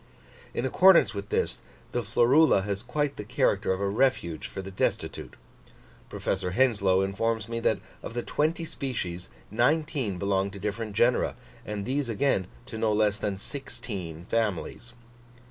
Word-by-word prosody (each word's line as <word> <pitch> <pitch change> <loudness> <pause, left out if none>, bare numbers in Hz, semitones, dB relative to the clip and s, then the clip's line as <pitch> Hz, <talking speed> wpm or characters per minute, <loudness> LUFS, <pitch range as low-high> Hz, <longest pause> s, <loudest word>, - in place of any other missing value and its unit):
In 120 - -1
accordance 185 +7 +6
with 100 -1 -6
this, - - 0 0.3
the 120 - 0
Florula 120 +2 +4
has 100 0 -2
quite 145 +4 -2
the - - -4
character 105 -3 +1
of 95 - 0
a 100 - 0
refuge 100 -7 +1
for 95 - -6
the 95 - -7
destitute: 95 - -2 0.7
Professor 90 - -2
Henslow 100 -6 +3
informs 110 +2 -1
me 115 0 -3
that - - +2 0.2
of 115 - -7
the 120 - -1
twenty 160 +3 0
species 90 - -4 0.2
nineteen 130 - +1
belong 100 +1 +1
to 100 0 -9
different 105 +1 -3
genera, 120 +2 +3 0.3
and 105 -1 -3
these 135 0 -1
again 110 -5 +1 0.2
to 115 -3 -7
no 110 -1 +2
less 105 -1 +2
than 100 -2 -2
sixteen 95 - -6
families! 110 +2 -2
110 Hz, 150 wpm, -27 LUFS, 100-125 Hz, 0.7 s, accordance